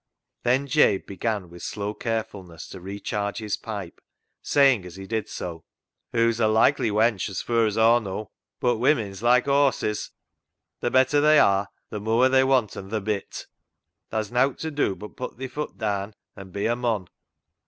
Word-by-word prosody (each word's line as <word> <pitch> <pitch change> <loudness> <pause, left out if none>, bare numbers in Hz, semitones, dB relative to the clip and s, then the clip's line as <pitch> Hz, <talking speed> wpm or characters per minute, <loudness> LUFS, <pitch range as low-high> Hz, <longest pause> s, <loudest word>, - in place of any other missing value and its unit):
Then 130 +3 +2
Jabe 140 -8 +3
began 100 -1 -3
with 85 - -11
slow 105 0 -4
carefulness 100 -8 -5
to 95 - -9
recharge 100 +2 -4
his 105 -2 -2
pipe, 100 -6 -7 0.4
saying 135 -8 +4
as 90 -1 -10
he 95 0 -8
did 110 +1 -3
so 85 -2 -6 0.2
— - - -65
" - - -56
Hoo's 115 -1 +2
a 110 - +4
likely 115 +3 +3
wench 110 -1 +1
as 95 - -4
fur 115 -1 +2
as 105 - -3
Aw 115 +2 +5
knaw. 105 0 -5 0.3
But 120 -2 +1
women's 110 -6 +1
like 120 +1 +4
horses, 140 -6 +1 0.4
— - - -60
the 120 - +1
better 130 +3 +4
they 155 +1 +6
are, 100 -5 +4 0.2
the 105 - -4
mooar 115 +4 +3
they 130 0 +5
wanten 125 -7 0
th' 110 -1 -2
bit. 105 -2 -3 0.6
Tha's 110 -2 -3
nowt 125 +2 +2
ta 160 - -4
do 145 -9 0
but 105 +2 -10
put 125 - -6
thi 130 +1 -5
foot 150 +3 -6
daan 100 -1 -2 0.2
an' 95 -1 -10
be 100 +2 -3
a 120 - +2
mon." 115 -6 -1
110 Hz, 185 wpm, -25 LUFS, 100-125 Hz, 0.6 s, they